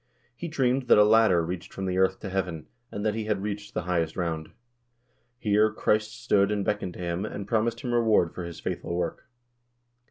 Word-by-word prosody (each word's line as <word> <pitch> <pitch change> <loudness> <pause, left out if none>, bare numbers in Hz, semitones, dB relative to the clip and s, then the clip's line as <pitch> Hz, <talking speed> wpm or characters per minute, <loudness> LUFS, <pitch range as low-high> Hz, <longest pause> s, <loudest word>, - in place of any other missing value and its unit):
He 170 - -5
dreamed 130 -4 0
that - - +7
a 105 - +8
ladder 105 -6 +5
reached 90 +1 -5
from 95 - -5
the 95 0 0
earth 95 0 +2
to 100 - -5
heaven, 90 -5 -2 0.3
and 100 +1 -4
that 110 - +2
he 110 0 -3
had 105 -2 -1
reached 105 0 -5
the - - -1
highest 85 -3 -1
round. 80 -3 -2 0.9
Here 105 -1 +3
Christ 110 +1 0
stood 100 -4 +3
and 100 -2 -1
beckoned 100 -3 -1
to - - -10
him, 85 +1 -2
and 100 -2 -5
promised 115 +1 0
him 120 -2 -3
reward 110 -8 +3
for 90 - -6
his 85 -1 -7
faithful 85 - -4
work. 85 -1 -3
100 Hz, 200 wpm, -27 LUFS, 90-110 Hz, 0.9 s, a